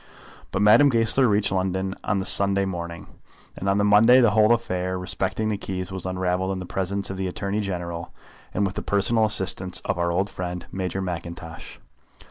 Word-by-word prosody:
But 100 - -1
Madame 115 +7 +6
Goesler 115 +2 +2
reached 105 -2 +1
London 95 0 -1
on 100 - 0
the 95 - -2
Sunday 100 -1 +4
morning, 85 -2 -5 0.5
and 95 - -3
on 100 - +2
the 100 - +2
Monday 110 +5 +6
the 120 -4 +4
whole 110 +1 +4
affair 95 -6 0
respecting 95 +3 -2
the 105 -2 -2
key 95 -2 -4
was 95 -1 -5
unravelled 95 +1 -1
in 95 - -4
the 90 - -6
presence 95 +2 -2
of 95 - -6
the 95 0 -2
Attorney 100 +3 -2
General, 85 -4 -5 0.4
and 100 - 0
with 95 - -2
the - - -4
personal 105 +3 +2
assistance 95 -3 0
of - - -2
our 85 0 +1
old 95 +3 0
friend, 90 0 -5
Major 95 0 -3
Mackintosh. 85 -2 -7
95 Hz, 190 wpm, -24 LUFS, 90-105 Hz, 0.5 s, Madame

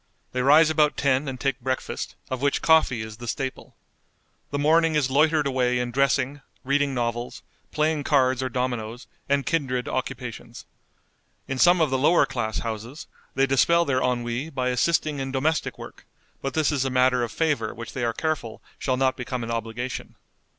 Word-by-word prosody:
They 125 - -1
rise 155 +4 +6
about 150 -1 +2
ten 140 +1 +1
and 130 -1 -5
take 135 -2 -1
breakfast, 130 +1 -3 0.2
of 130 -1 -3
which 140 0 0
coffee 155 -8 +4
is 110 -1 -9
the 120 +1 -9
staple. 135 +3 -4 0.7
The 145 - -2
morning 160 +2 +3
is 135 -3 +1
loitered 155 +2 +3
away 125 -2 +1
in 125 0 -2
dressing, 140 +1 +1 0.2
reading 140 0 +1
novels, 120 0 -3 0.3
playing 155 -1 0
cards 130 -3 +2
or 130 - -1
dominoes, 120 -2 -3 0.2
and 140 -1 +2
kindred 130 -5 -1
occupations. 125 -2 -5 0.8
In 135 -1 -3
some 175 +3 +6
of 155 -4 +2
the 130 - +1
lower 160 +6 +4
class 115 -4 -3
houses 115 +6 -6 0.3
they 135 +1 +3
dispel 170 +6 +3
their 130 -3 +1
ennui 125 +3 -1
by 130 -4 -1
assisting 150 +3 +1
in 135 0 -3
domestic 145 +4 -1
work, - - -11 0.3
but 135 - -4
this 155 -2 +2
is 140 -3 0
a 135 - -1
matter 125 -1 +3
of 120 -2 -2
favor 145 -10 0
which 115 +1 -9
they 130 - -3
are 115 - +1
careful 145 -3 -3 0.2
shall 130 -2 0
not 130 0 +2
become 125 -1 -4
an 115 - -4
obligation. 115 +2 -4
130 Hz, 180 wpm, -25 LUFS, 125-145 Hz, 0.8 s, rise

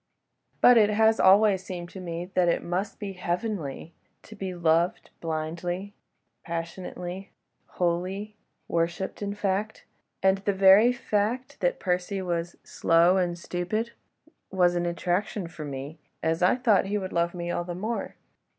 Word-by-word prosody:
But 245 -1 +8
it 210 -1 +5
has 220 +1 +3
always 195 0 +5
seemed 175 -2 -6
to 190 - -9
me 170 -1 -5
that 180 -1 +3
it - - 0
must 180 +4 -3
be 200 -3 -5
heavenly 175 -4 -3 0.3
to 215 - -12
be 190 -2 -5
loved 170 +1 +1
blindly, 170 +4 -3 0.5
passionately, 175 +2 -6 0.5
wholly... 185 +4 -1 0.3
worshipped, 170 +4 -2
in 200 0 -3
fact—and 195 -1 -2
the 200 +1 0
very 195 +5 +7
fact 245 +3 -2
that 175 - 0
Percy 180 +2 -1
was 175 -2 -3
slow 170 +3 +3
and 175 -2 0
stupid 180 +7 -3 0.6
was 180 -2 +3
an 175 0 0
attraction 180 +3 -1
for 155 -2 -8
me, 140 +3 -7 0.2
as 160 +1 0
I 180 - +5
thought 235 -7 +3
he 205 +1 0
would 190 -2 -5
love 170 +1 0
me 175 0 -3
all 175 - -1
the 175 0 -6
more. 220 +6 -3
180 Hz, 145 wpm, -27 LUFS, 170-205 Hz, 0.6 s, But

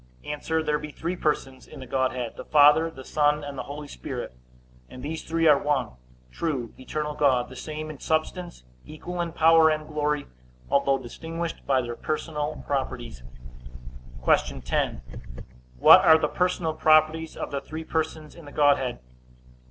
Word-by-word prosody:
A. 150 - -4 0.3
There 150 -1 0
be 150 0 -7
three 170 +4 -4
persons 135 -5 -2
in - - -11
the 130 - -8
Godhead, 130 -2 -2
the - - -8
Father, 150 +2 +5
the 135 -5 -11
Son, 150 0 +1
and 145 -1 -6
the - - -4
Holy 145 +1 -7
Ghost; 60 - -6 0.6
and 125 - -10
these 160 +2 -4
three 165 0 -1
are 150 -3 +6
one 145 -5 0 0.4
true, 130 - -3
eternal 150 +3 -4
God, 130 -4 +2
the 130 - -11
same 155 +2 -6
in 145 - -11
substance, 160 - -2 0.2
equal 175 +3 -6
in 170 -1 -3
power 160 0 +5
and 155 0 -1
glory; 150 -1 -1 0.5
although 140 -1 +3
distinguished 165 +7 -6
by 135 -2 +3
their 120 0 -5
personal 150 0 -3
properties. 130 - -3 1.0
Q. - - +2
10. 65 0 -1 0.8
What - - +9
are 160 - +8
the 155 - 0
personal 180 -1 0
properties 155 +1 +3
of - - -5
the 140 -1 -2
three 160 +1 -7
persons 155 -1 -3
in 170 - -13
the 145 - -11
Godhead? 140 -4 +2
150 Hz, 160 wpm, -26 LUFS, 135-160 Hz, 1.0 s, What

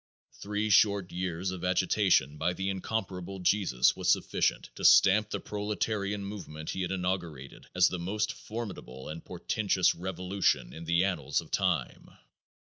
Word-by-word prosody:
Three 105 +1 -2
short 100 -2 +4
years 90 0 -3
of 90 -1 -7
agitation 90 -5 +2
by 90 - +1
the 95 +2 -2
incomparable 95 -1 -4
Jesus 90 -9 +2
was - - -1
sufficient - - 0
to - - -9
stamp 105 +2 +6
the - - -3
proletarian 105 -1 -2
movement 85 -6 -6
he 95 - -3
had 90 0 -2
inaugurated 90 -7 -4
as 90 0 +6
the 90 - -3
most 105 +5 -1
formidable 100 - -7
and 80 +1 -7
portentous 95 +1 +1
revolution 90 -7 -1
in 80 +1 -8
the 85 +2 +2
annals 75 -8 0
of - - -10
time. - - -1
95 Hz, 145 wpm, -29 LUFS, 85-100 Hz, -, stamp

